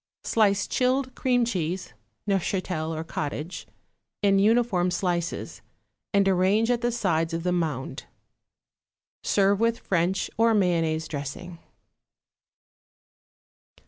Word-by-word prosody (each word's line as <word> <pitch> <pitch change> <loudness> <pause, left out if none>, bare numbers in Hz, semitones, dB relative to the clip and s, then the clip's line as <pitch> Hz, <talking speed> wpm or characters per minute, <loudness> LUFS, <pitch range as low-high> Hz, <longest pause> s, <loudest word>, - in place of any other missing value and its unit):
Slice 205 -3 +2
chilled 255 +1 0
cream 245 -2 +1
cheese 180 - -3 0.3
(Neufchatel 185 -4 -1
or 160 0 -3
cottage) 155 +1 -5 0.6
in 195 -1 +4
uniform 210 -4 +3
slices, 175 -1 -2 0.5
and 200 -1 +3
arrange 195 +5 +3
at 240 -1 0
the 240 0 +1
sides 165 -8 0
of 165 - -3
the 180 - +1
mound. 150 -7 -2 1.2
Serve 200 0 +2
with 230 0 +2
French 185 -1 0
or 225 0 +4
mayonnaise 165 -5 +1
dressing. 160 +4 -6
185 Hz, 105 wpm, -26 LUFS, 165-220 Hz, 1.2 s, in